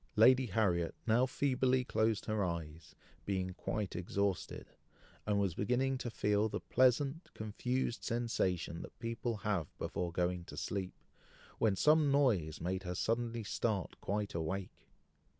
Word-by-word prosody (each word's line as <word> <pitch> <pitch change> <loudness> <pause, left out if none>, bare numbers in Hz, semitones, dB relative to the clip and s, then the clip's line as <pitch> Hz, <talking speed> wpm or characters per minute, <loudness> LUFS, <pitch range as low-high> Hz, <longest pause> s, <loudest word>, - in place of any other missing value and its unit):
Lady 125 +3 +6
Harriet 90 -5 +1
now 120 +3 +4
feebly 130 -1 +2
closed 110 -3 +1
her 110 -2 0
eyes, 80 -3 -5 0.3
being 95 -2 -1
quite 105 +2 -3
exhausted, 95 +2 -2 0.6
and 105 -1 +2
was 100 -4 +1
beginning 125 +8 +1
to 125 -2 -4
feel 105 -1 +1
the - - -3
pleasant, 135 +5 +2
confused 120 +3 -2
sensation 95 -8 -1
that - - -10
people 115 0 -3
have 95 -8 -1
before 90 -1 -3
going 90 +1 0
to 75 - -10
sleep, 95 +5 -3 0.6
when 105 -3 +3
some 150 +5 +5
noise 105 - +2
made 95 +3 -2
her 90 -1 -4
suddenly 115 +2 -1
start 105 -3 -1
quite 105 0 -2
awake. 85 +4 -4
105 Hz, 135 wpm, -35 LUFS, 90-120 Hz, 0.6 s, Lady